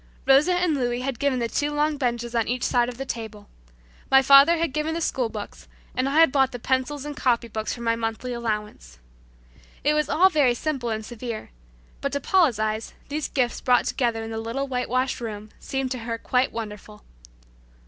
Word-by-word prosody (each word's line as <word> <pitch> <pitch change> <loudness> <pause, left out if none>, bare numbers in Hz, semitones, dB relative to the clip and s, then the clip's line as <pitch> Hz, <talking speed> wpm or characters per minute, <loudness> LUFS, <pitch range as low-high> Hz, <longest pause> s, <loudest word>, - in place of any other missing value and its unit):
Rosa 285 +7 +5
and 355 -2 +1
Louis 245 -3 -1
had 260 -2 -3
given 280 -2 +1
the 235 -1 0
two 290 +5 -1
long 300 +1 +1
benches 240 -3 -2
on 230 -2 +1
each 245 +1 -2
side 240 -1 +2
of 245 - -8
the 270 - -4
table. 220 -4 -6 0.6
My 270 0 +6
father 280 +5 +7
had 330 -4 -1
given 305 +2 -1
the - - -1
school 255 -7 -1
books, 210 -2 -8 0.3
and 260 +2 0
I 295 +3 +2
had 325 - +6
bought 265 -3 +1
pencils 265 +2 -1
and 295 -1 -5
copy 240 -4 +1
books 220 -1 -4
from 235 - -6
my 230 0 +2
monthly 230 +2 -3
allowance. 210 - -4 0.9
It 295 - +3
was 300 0 0
all 375 +3 +5
very 280 -6 +3
simple 265 -3 -2
and 220 -1 -3
severe, 235 -1 -6 0.5
but 280 - -1
to 285 - 0
Paula's 320 - +3
eyes 215 0 -2
these 295 +1 -2
gifts 250 -3 -1
brought 250 -1 +3
together 230 -3 -1
in 225 - -6
the 225 - -3
little 235 +5 -3
whitewashed 255 0 -1
room 215 -2 -6
seemed 270 -1 -3
to 255 - -2
her 230 0 -4
quite 250 +3 +1
wonderful. 210 -1 -8
250 Hz, 200 wpm, -24 LUFS, 230-280 Hz, 0.9 s, father